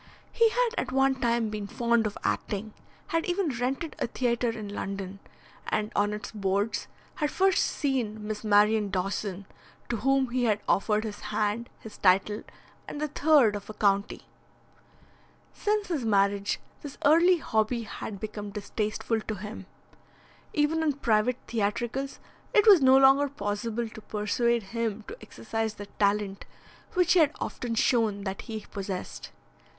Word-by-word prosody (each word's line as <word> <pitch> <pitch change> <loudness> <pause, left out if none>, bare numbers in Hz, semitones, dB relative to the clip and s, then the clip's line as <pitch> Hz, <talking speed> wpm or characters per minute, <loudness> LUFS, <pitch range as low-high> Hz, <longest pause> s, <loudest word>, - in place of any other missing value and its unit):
He 460 -1 +4
had - - +2
at 260 - -3
one 270 +1 +3
time 235 -3 0
been 210 -1 -4
fond 235 +1 +1
of 210 - -6
acting, 210 +1 -2 0.4
had 330 0 +1
even 355 -1 0
rented 270 +6 -2
a - - 0
theatre 240 -1 0
in 220 -2 -5
London, 195 -1 -5 0.5
and 210 0 -1
on 205 0 +2
its 210 0 -5
boards 205 +1 -1 0.3
had 300 - 0
first 385 +3 +3
seen 235 -7 -1
Miss 215 0 -4
Marion 210 0 +4
Dawson, 195 +1 -3 0.4
to 240 - 0
whom 265 +2 +2
he 250 0 +1
had 215 -2 +2
offered 210 +2 +2
his 210 -2 -5
hand, 215 +3 -1
his 220 - -12
title, 195 +3 +3 0.5
and 290 - -6
the 305 0 -1
third 285 -7 +4
of 205 0 -7
a 215 - -7
county. 200 -1 +1 1.3
Since 420 -1 -1
his 310 -8 -1
marriage 200 -2 +2 0.2
this 290 -2 -8
early 340 +5 +6
hobby 225 -4 0
had 200 -1 -7
become 210 -1 -5
distasteful 215 +2 -2
to 215 - -4
him. 210 +3 -8 0.8
Even 300 +2 +1
in 310 -2 +2
private 235 -2 +1
theatricals 240 +5 -2 0.4
it 420 - +6
was 400 -7 +8
no 265 0 +7
longer 270 +1 +6
possible 225 -1 -3
to 220 - -11
persuade 220 +3 0
him 225 -2 -2
to 460 - -8
exercise 225 -1 -4
the 205 - -7
talent 200 -1 +1 0.5
which 360 -1 +4
he 365 - +5
had 305 -2 +4
often 235 -2 -3
shown 220 -4 +2
that 195 -1 -4
he 220 -1 -5
possessed. 195 -2 -5
220 Hz, 155 wpm, -28 LUFS, 205-270 Hz, 1.3 s, was